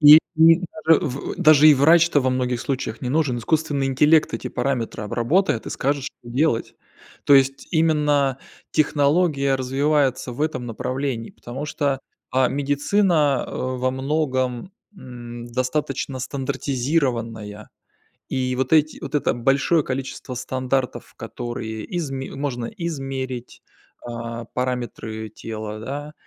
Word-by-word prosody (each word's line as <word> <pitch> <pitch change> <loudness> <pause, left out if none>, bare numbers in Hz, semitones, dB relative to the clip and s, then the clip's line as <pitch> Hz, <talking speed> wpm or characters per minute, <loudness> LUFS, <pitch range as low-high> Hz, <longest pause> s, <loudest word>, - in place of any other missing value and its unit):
И 150 +1 +11 0.2
и 165 +2 +7 0.3
даже 160 -1 +6
в 135 0 -4
даже 155 0 +7
и 150 - +8
врач-то 160 +2 +5
во 130 - +1
многих 125 -1 -1
случаях 130 -4 -3
не 125 - -3
нужен. 140 -4 +1
Искусственный 145 +1 0
интеллект 150 +4 +3
эти - - -4
параметры 120 -5 -2
обработает 120 - +1
и - - -5
скажет, 140 0 -1
что - - -6
делать. 120 0 0 0.5
То 145 - +6
есть, 135 0 +3
именно 150 -4 +2 0.3
технология 145 -1 +2
развивается 135 0 +1
в 125 - -9
этом 155 -6 -2
направлении, 125 0 -3
потому 130 +5 -7
что, 140 -3 -1 0.3
а, 130 -1 +3
медицина 145 +1 +1
во 130 0 -2
многом, 130 +1 -1 0.2
м, 120 -3 -9
достаточно 130 +1 -2
стандартизированная. 125 -5 -2 0.6
И 130 -1 -1
вот 130 +5 -1
эти 155 -1 +3
вот - - -7
это 145 - +1
большое 135 +6 +2
количество 130 0 -5
стандартов, 130 +1 -2
которые 115 -3 -5
изме 135 -5 -4
можно 130 -4 -3
измерить, 135 -7 -5 0.4
а 115 -1 -6
параметры 120 -4 -4
тела, 110 -1 -6
да, 145 +5 -6
135 Hz, 125 wpm, -22 LUFS, 125-150 Hz, 0.6 s, И